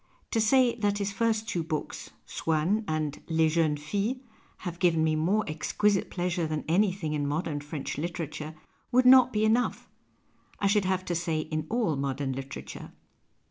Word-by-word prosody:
To 225 - +2
say 245 +2 +4
that 205 -2 +1
his 200 -1 -2
first 220 +1 0
two 175 - -1
books, 155 -2 -4
" - - -39
Swann 165 +7 0
" - - -20
and 155 -2 -2
" - - -26
Les 160 -1 +3
Jeunes 155 -2 +1
Filles," 205 - -1 0.5
have 175 -1 -5
given 165 -4 +3
me 155 -1 +2
more 185 +8 +2
exquisite 195 +6 0
pleasure 175 -2 -1
than 155 -1 -3
anything 185 -2 +1
in 145 -1 -1
modern 150 0 -2
French 145 -1 -5
literature 155 -2 -4 0.4
would 255 +1 +4
not 255 0 +8
be 215 -1 +1
enough 230 +3 +1 0.4
— - - -34
I - - -1
should 200 0 +3
have 185 0 0
to 175 - -2
say, 165 -2 -1
in 155 0 -4
all 220 -9 +1
modern 135 0 -2
literature. 135 +1 -8
170 Hz, 180 wpm, -28 LUFS, 155-210 Hz, 0.5 s, not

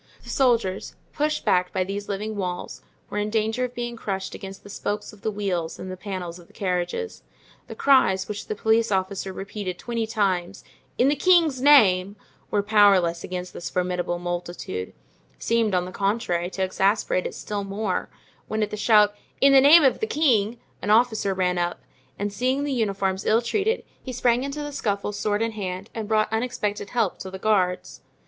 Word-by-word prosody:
The - - -8
soldiers, 235 -8 +1 0.2
pushed 300 0 -1
back 180 0 +2
by 185 - 0
these 200 +2 -5
living 210 +2 -3
walls, 180 -3 -4 0.3
were 210 - -1
in 210 0 -1
danger 220 +3 0
of 250 0 -8
being 240 0 -4
crushed 195 -4 -4
against 195 -1 -9
the 205 - -12
spokes 210 +1 -4
of 205 - -16
the 220 - -1
wheels 190 -6 -2
and 185 - -7
the - - -5
panels 185 -2 -6
of 170 - -16
the - - -23
carriages. 190 - -2 0.5
The - - -8
cries 190 -9 +3
which 210 -1 -6
the 215 - -3
police 225 +1 +2
officer 190 0 -1
repeated 195 -1 -5
twenty 230 -2 -3
times: 195 -4 -1 0.3
"In 250 - +4
the 290 - +3
king's 325 -4 +4
name," 205 -9 +5 0.3
were 205 -1 +1
powerless 200 -5 +4
against 180 0 -5
this 175 - -6
formidable 180 -1 -1
multitude—seemed, 175 - -3
on 180 0 +1
the 185 - -7
contrary, 195 -4 -1
to 190 0 -2
exasperate 190 0 +1
it - - -8
still 205 -1 -4
more; 195 -1 -2 0.4
when, 215 0 -1
at 210 - -3
the 210 - -4
shout, 210 -1 +5 0.3
"In 275 0 +6
the 270 - +8
name 300 +4 +8
of 265 - +3
the 440 - -1
king," 235 - +2 0.2
an - - -3
officer 220 -3 +3
ran 180 -1 +1
up, 175 0 -1 0.4
and 205 0 -3
seeing 255 +6 0
the 290 -1 -1
uniforms 195 -5 -1
ill 225 +2 +3
treated, 430 - 0 0.2
he 260 - -6
sprang 245 0 +2
into 280 +2 -4
the 290 - -5
scuffle 205 -7 -2
sword 205 +1 -1
in 230 - -1
hand, 195 -1 -5
and 220 -2 -4
brought 215 0 +1
unexpected 215 -3 -2
help 230 -6 0
to 190 - -6
the 190 - -7
guards. 190 -3 0
205 Hz, 185 wpm, -24 LUFS, 185-230 Hz, 0.5 s, the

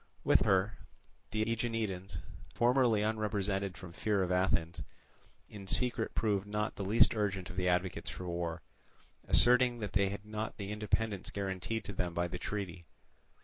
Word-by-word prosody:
With - - +4
her, 95 +2 +2 0.5
the 110 0 0
Aeginetans, 110 -4 -2 0.4
formally 120 -3 +3
unrepresented 100 -3 -1
from 90 -3 -10
fear 100 +1 +1
of 90 - -2
Athens, 85 -3 +1 0.7
in 100 -2 -10
secret 120 +1 0
proved 105 -3 +1
not 105 +1 -2
the 100 - -4
least 105 +4 +5
urgent 95 -4 -1
of - - -9
the 90 -1 +1
advocates 90 +1 0
for 90 - -6
war, 85 -1 -3 0.6
asserting 125 0 +6
that 105 -3 -5
they 100 0 +3
had 100 +1 -6
not 105 +1 -4
the 100 -1 -5
independence 105 -1 -1
guaranteed 100 +3 -3
to 100 - -5
them 90 -2 -2
by 85 +1 +1
the 90 +1 -6
treaty. 95 -4 -4
100 Hz, 155 wpm, -33 LUFS, 95-110 Hz, 0.7 s, asserting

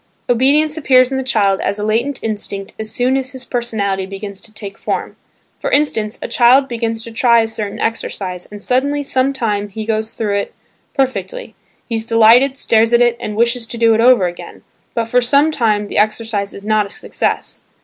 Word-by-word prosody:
Obedience 290 +6 +2
appears 255 -4 +4
in 265 - -1
the - - -2
child 200 -6 +1
as 200 - -1
a 210 - -4
latent 235 +6 -1
instinct 205 -2 -4
as 220 0 -3
soon 245 +3 +1
as 265 -1 -3
his 260 -1 -9
personality 200 -6 -2
begins 195 0 -7
to 225 - -10
take 200 -2 -8
form. - - -4 0.4
For - - -2
instance, 225 - +1
a - - -3
child 260 +3 +4
begins 230 -2 -3
to 230 - -9
try 235 0 +4
a 225 - -1
certain 215 -2 -5
exercise 185 -5 -3
and 205 -1 -9
suddenly 285 +3 0
some 265 0 +1
time 210 -6 -2
he 215 +2 -6
goes 220 0 -2
through 205 -3 -1
it 200 - -4 0.4
perfectly; 275 - -2 0.3
he 235 - -5
is 220 - -4
delighted, 230 +4 +5
stares 230 -3 +2
at 235 - +5
it, 240 -1 +2
and 210 - -5
wishes 235 +1 +1
to 235 - -5
do 230 -1 +4
it 220 - +2
over 240 -5 +5
again, 175 0 -7 0.3
but 230 - 0
for 250 +2 +2
some 280 +5 +3
time 215 -7 0
the - - -1
exercise 215 -1 -1
is 200 - -10
not 215 -1 +2
a - - -16
success. - - -3
230 Hz, 200 wpm, -17 LUFS, 210-255 Hz, 0.4 s, delighted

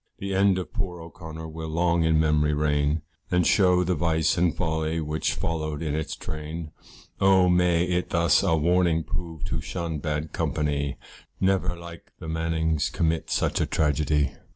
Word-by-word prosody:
The 100 0 -4
end 95 0 +3
of 90 - -5
poor 95 -6 -3
O'Connor 80 -1 -9
will 80 0 -6
long 85 +1 +2
in 80 -1 +3
memory 75 -1 +2
reign, 75 0 +1 0.3
And 90 -1 +2
shew 90 -3 +4
the 90 +1 +1
vice 80 0 +1
and 85 -1 +1
folly 80 -1 -1
which 75 0 -1
followed 80 -2 -3
in 75 -2 -2
its 80 0 -3
train. 80 +1 -6 0.5
Oh! 95 -1 +5
may 90 -1 +3
it 90 0 -1
thus 85 -2 +3
a 85 -4 +2
warning 85 0 +2
prove 80 0 -5
to - - -2
shun 85 -3 -4
bad 75 0 -3
company, 70 -2 -1 0.4
Never 95 -2 +1
like 85 0 -11
the - - -9
Mannings 80 -1 0
commit 80 -1 -1
such - - 0
a - - +1
tragedy. 75 -2 +1
80 Hz, 165 wpm, -26 LUFS, 75-90 Hz, 0.5 s, Oh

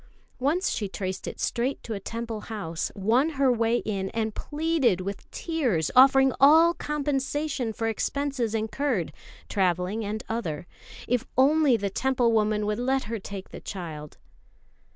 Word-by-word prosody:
Once 310 +9 +1
she 205 -4 -2
traced 190 -1 -4
it - - -6
straight 255 +3 -1
to 225 - -4
a 200 - -4
Temple 230 +2 -5
house, 170 -7 -3
won 230 +10 +2
her 270 -2 +4
way 230 0 +2
in, 195 -4 -3
and 220 -1 -1
pleaded 295 - 0
with 195 +1 -6
tears, 250 - -1
offering 265 0 +7
all 320 +5 +7
compensation 290 -4 -2
for 225 +1 -4
expenses 250 0 -1
incurred 220 - -1 0.3
(travelling 185 +3 0
and 215 +1 -4
other) 175 -10 -3 0.4
if 245 -1 0
only 280 -1 +5
the 200 -2 -2
Temple 250 0 +1
woman 215 -1 +1
would 210 +1 -1
let 265 +2 +1
her 225 +1 -4
take 195 0 -8
the - - -9
child. 155 -6 -7
230 Hz, 150 wpm, -26 LUFS, 200-270 Hz, 0.4 s, offering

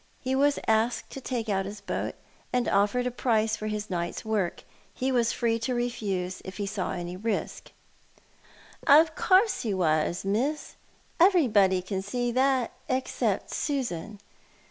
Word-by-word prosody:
He 260 0 -2
was 285 +2 +3
asked 225 +2 +1
to 270 - -7
take 240 -3 -3
out 195 -2 0
his 205 +1 -7
boat, 200 - -3 0.4
and 250 -1 +1
offered 205 +5 +2
a 250 - 0
price 225 -3 +1
for 215 - -5
his 210 0 -3
night's 175 +2 -3
work. 210 -5 -1 0.3
He 260 +1 -1
was 240 -3 +2
free 230 -1 0
to 245 +2 -2
refuse, 200 -7 -2
if 190 0 -8
he 205 - -2
saw 195 -2 -3
any 175 0 -5
risk." 215 +4 -3 0.6
" - - -24
Of 320 0 +2
course 390 +3 +3
he 215 -4 -1
was, 165 0 +1
Miss. 255 +10 -1 0.5
Everybody 220 - +4
can 190 0 -3
see 240 +5 -2
that, 260 -1 +2 0.2
except 260 0 -1
Susan. 220 - -3
220 Hz, 155 wpm, -27 LUFS, 195-255 Hz, 0.6 s, Everybody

